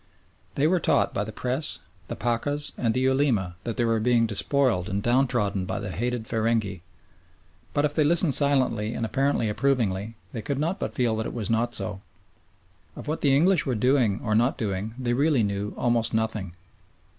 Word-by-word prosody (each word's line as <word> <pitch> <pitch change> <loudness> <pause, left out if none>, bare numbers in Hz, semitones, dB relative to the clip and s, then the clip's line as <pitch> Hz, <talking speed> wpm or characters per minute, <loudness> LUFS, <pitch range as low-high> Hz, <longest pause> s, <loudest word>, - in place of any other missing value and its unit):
They 140 - +1
were 180 +3 +3
taught - - +1
by 100 - -1
the 110 - -6
Press, 130 +7 -2 0.3
the - - -5
Pachas, 145 +5 -2
and 115 -2 -1
the 130 - +1
Ulema 130 -10 +1
that 115 - -4
they 120 - +1
were 115 -1 +1
being 120 0 +3
despoiled 110 -2 +1
and 100 0 -2
downtrodden 120 -6 +1
by - - -3
the 100 -2 -5
hated 120 +3 -2
feringhee, 110 -5 -1 0.9
but 145 - +1
if 145 - -1
they 155 - +2
listened 165 0 +4
silently 125 -6 +2
and 115 - -2
apparently 135 -1 0
approvingly, 110 -3 0 0.2
they 115 - -4
could 140 +4 -3
not 165 +6 -1
but - - -4
feel 120 -4 +1
that 110 - -2
it - - -7
was 115 -1 -2
not 115 +1 +1
so. 105 -3 -2 0.9
Of - - -9
what 155 +2 -2
the 140 -2 +3
English 170 +1 +3
were 130 - 0
doing 125 -3 +2
or 110 - 0
not 120 +8 +2
doing 105 -1 -3
they 125 -2 -1
really 140 -1 +2
knew 100 0 -3
almost 120 -2 +1
nothing. 110 -5 -2
120 Hz, 190 wpm, -25 LUFS, 110-135 Hz, 0.9 s, listened